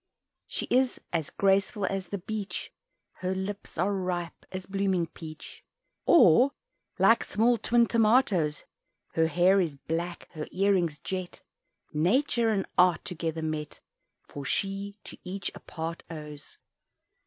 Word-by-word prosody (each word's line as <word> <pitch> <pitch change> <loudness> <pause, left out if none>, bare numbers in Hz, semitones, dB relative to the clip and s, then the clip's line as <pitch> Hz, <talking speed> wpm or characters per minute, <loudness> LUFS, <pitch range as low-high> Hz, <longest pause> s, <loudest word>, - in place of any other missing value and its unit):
She - - -3
is 255 0 +3
as 160 -3 0
graceful 195 +1 +2
as 195 -2 -2
the 200 - -3
beech 205 +2 -5 0.4
Her 185 0 -2
lips 190 0 -5
are 190 +5 +1
ripe 180 -3 -3
as 185 -1 -5
blooming 190 -2 0
peach, 155 -1 -10 0.4
Or 260 - +6 0.4
like 230 - +5
small 230 +3 +2
twin 235 0 +4
tomatoes; 215 - +3 0.5
Her 160 0 +3
hair 180 +4 +4
is 160 -5 -2
black, 170 +4 -4
her 155 -3 -6
earrings 185 -5 +2
jet, 185 +1 -5 0.5
Nature 230 - +2
and 200 -3 +1
art 180 -1 +4
together 165 -2 -3
met 155 -1 -4 0.5
For 145 - -7
she 200 +5 -2
to - - -9
each 190 +2 -4
a - - -10
part 165 +1 -6
owes. 150 -3 -9
185 Hz, 130 wpm, -28 LUFS, 165-200 Hz, 0.5 s, Or